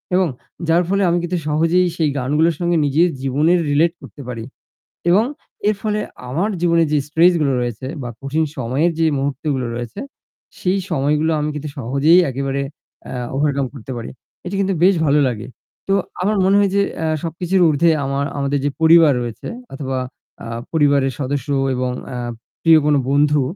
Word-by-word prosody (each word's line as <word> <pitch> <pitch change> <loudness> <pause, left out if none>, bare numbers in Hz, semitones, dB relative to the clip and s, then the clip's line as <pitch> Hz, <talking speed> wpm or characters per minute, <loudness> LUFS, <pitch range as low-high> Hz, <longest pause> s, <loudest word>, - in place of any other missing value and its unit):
এবং 185 -1 +3 0.4
যার 170 +2 +3
ফলে 200 0 +2
আমি 175 - +2
কিন্তু 175 +1 -1
সহজেই 165 +4 +2
সেই 155 -3 +2
গানগুলোর 150 +6 +1
সঙ্গে 175 -1 +1
নিজের 160 +5 +3
জীবনের 150 +7 +2
রিলেট 160 +4 +3
করতে 145 - -11
পারি 115 -3 -5 0.7
এবং 200 +5 +5 0.4
এর 215 - +3
ফলে 210 -1 -1 0.3
আমার 170 +11 0
জীবনে 170 -1 +3
যে 150 - +3
স্ট্রেস 165 +4 +4
গুলো 140 -3 +2
রয়েছে 120 +1 -4 0.2
বা 120 - -4
কঠিন 150 +4 0
সময়ের 135 +7 +1
যে 165 - +3
মুহূর্ত 140 +2 -3
গুলো 125 -2 -2
রয়েছে, 120 -1 -6 0.6
সেই 185 +1 +1
সময়গুলো 150 +4 +1
আমি 150 0 -1
কিন্তু 150 0 -5
সহজেই 140 +7 +4
একেবারে 135 +1 -2 0.5
এ - - -5 0.2
ওভারকাম 140 -1 +1
করতে 130 -1 -9
পারি। 115 - -6 0.4
এটি 185 +2 -4
কিন্তু 195 0 +1
বেশ 195 +1 +6
ভালো 145 +1 +3
লাগে। 115 -3 -4 0.4
তো 195 - +2 0.3
আমার 205 +2 +1
মনে 195 +1 +4
হয় 200 - +3
যে 200 - +4 0.2
এ - - 0 0.2
সবকিছুর 180 +3 0
উর্ধ্বে 155 +3 +3
আমার 140 +1 -1
আমাদের 140 0 0
যে - - +2
পরিবার 160 -2 +7
রয়েছে 120 -2 -6 0.3
অথবা 135 -1 -3 0.5
আ - - -6 0.2
পরিবারের 140 -4 +2
সদস্য 140 -1 -2 0.3
এবং 125 0 -1 0.2
এ - - -3 0.5
প্রিয় 165 -1 +7
কোন 150 -1 +4
বন্ধু 145 +1 +3
150 Hz, 170 wpm, -19 LUFS, 135-170 Hz, 0.7 s, পরিবার